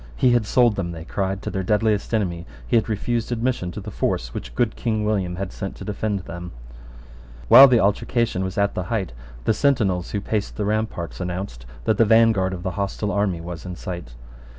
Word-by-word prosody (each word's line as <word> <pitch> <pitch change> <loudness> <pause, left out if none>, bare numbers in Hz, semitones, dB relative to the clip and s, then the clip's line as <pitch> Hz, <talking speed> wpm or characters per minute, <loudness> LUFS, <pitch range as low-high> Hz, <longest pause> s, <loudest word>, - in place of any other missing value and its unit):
He 125 - +3
had 120 -3 +2
sold 120 -3 +3
them, 85 -3 -2
they 80 -1 -8
cried, 95 +1 -2
to - - -3
their 95 - -2
deadliest 105 +2 +1
enemy: 90 -6 -1 0.2
he - - 0
had 115 0 +2
refused 115 +2 -1
admission 120 -6 -1
to - - -6
the 105 +1 -7
force - - -2
which 60 -1 -7
good 120 -2 +1
King 110 -3 -1
William 95 -5 0
had 95 +1 -5
sent 100 -2 -5
to - - -9
defend 105 -1 -2
them. 85 +1 -8 1.0
While 130 +4 +11
the 125 -3 +4
altercation 105 0 +1
was 95 0 -4
at 100 0 +2
the 90 - -3
height, 95 - -2 0.3
the - - +2
sentinels 105 -9 +1
who 100 - -2
paced 105 0 -2
the 105 - -1
ramparts 105 -5 -2
announced 90 -9 -5 0.2
that 110 - +1
the 115 - +6
vanguard 110 -4 +4
of 90 -1 -6
the 95 - -2
hostile 100 +1 -2
army 100 -5 0
was 85 -1 -7
in 90 -1 -6
sight. 85 -9 -7
100 Hz, 205 wpm, -23 LUFS, 90-110 Hz, 1.0 s, While